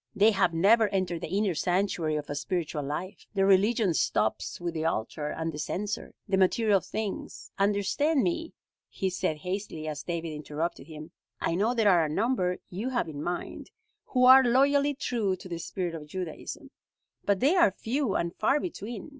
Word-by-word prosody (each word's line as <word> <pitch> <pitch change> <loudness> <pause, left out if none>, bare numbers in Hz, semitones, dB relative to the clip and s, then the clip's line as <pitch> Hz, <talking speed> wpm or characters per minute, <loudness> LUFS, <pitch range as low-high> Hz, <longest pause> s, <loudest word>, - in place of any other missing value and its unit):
They 210 +2 +5
have 195 -4 +2
never 210 +7 +4
entered 180 -3 -1
the - - -4
inner 200 +1 +1
sanctuary 175 -2 0
of 150 -1 -3
a - - -3
spiritual 155 +1 -2
life. 150 +7 -5
Their 195 -1 +3
religion 200 0 +3
stops - - 0
with 175 -1 -3
the 160 -1 -3
altar 150 0 -2
and 160 +2 -3
the 150 - -7
censer 205 +6 -4
the 195 -2 +1
material 200 +2 +3
things. 215 +2 -5
Understand 210 +9 +2
me," 335 -1 -2 0.4
he 190 -1 -2
said 160 -3 -1
hastily, 180 -2 -5
as 150 -1 -4
David 170 -1 -4
interrupted 150 +1 -4
him, 155 0 -10 0.3
"I - - 0
know 215 +8 +1
there 225 -3 +3
are 175 -3 +4
a 155 - -1
number 185 0 0
you 205 +8 -3
have 245 -7 -1
in 145 -2 -6
mind, 175 +2 -4 0.4
who 250 -1 +2
are 260 +1 +9
loyally 280 +3 +3
true 220 -7 -1
to 185 - -11
the 170 -2 -5
spirit 175 0 -3
of 155 -2 -7
Judaism, 175 0 -6 0.5
but 200 -2 +1
they 290 +8 +3
are 345 - +6
few 230 +3 -2
and 170 +1 -1
far 270 +7 +2
between. 240 - -6
190 Hz, 180 wpm, -28 LUFS, 165-225 Hz, 0.5 s, are